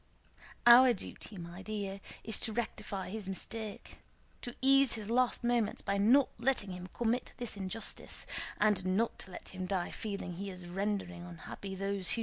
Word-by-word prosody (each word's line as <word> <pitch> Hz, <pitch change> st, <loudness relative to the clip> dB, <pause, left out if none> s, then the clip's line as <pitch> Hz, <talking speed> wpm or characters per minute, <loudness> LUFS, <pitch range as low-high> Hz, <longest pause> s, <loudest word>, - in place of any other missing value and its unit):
Our 245 Hz, +1 st, +9 dB
duty, 205 Hz, 0 st, -8 dB
my 170 Hz, +1 st, -7 dB
dear, 200 Hz, -1 st, -4 dB, 0.2 s
is 220 Hz, -, +3 dB
to 220 Hz, -, +1 dB
rectify 205 Hz, -4 st, -3 dB
his 210 Hz, -2 st, -4 dB
mistake, 215 Hz, +2 st, -5 dB, 0.4 s
to 245 Hz, -, -6 dB
ease 275 Hz, 0 st, +5 dB
his 220 Hz, -1 st, -4 dB
last 250 Hz, 0 st, +2 dB
moments 235 Hz, -3 st, +1 dB
by 200 Hz, 0 st, 0 dB
not 250 Hz, +7 st, +6 dB
letting 235 Hz, -5 st, +1 dB
him 180 Hz, 0 st, -6 dB
commit 240 Hz, +1 st, 0 dB
this 240 Hz, -3 st, -4 dB
injustice, 200 Hz, +3 st, -3 dB, 0.3 s
and 205 Hz, -3 st, +3 dB
not 190 Hz, +5 st, +1 dB
to 190 Hz, -, -6 dB
let -, -, -8 dB
him 185 Hz, -1 st, -5 dB
die 180 Hz, -2 st, -1 dB
feeling 200 Hz, -4 st, -4 dB
that 170 Hz, -, -7 dB
he 200 Hz, +1 st, -4 dB
is 180 Hz, -1 st, -8 dB
rendering 190 Hz, -1 st, -2 dB
unhappy 175 Hz, +3 st, -7 dB
those 195 Hz, -2 st, 0 dB
who..." -, -, 0 dB
200 Hz, 170 wpm, -33 LUFS, 190-230 Hz, 0.4 s, Our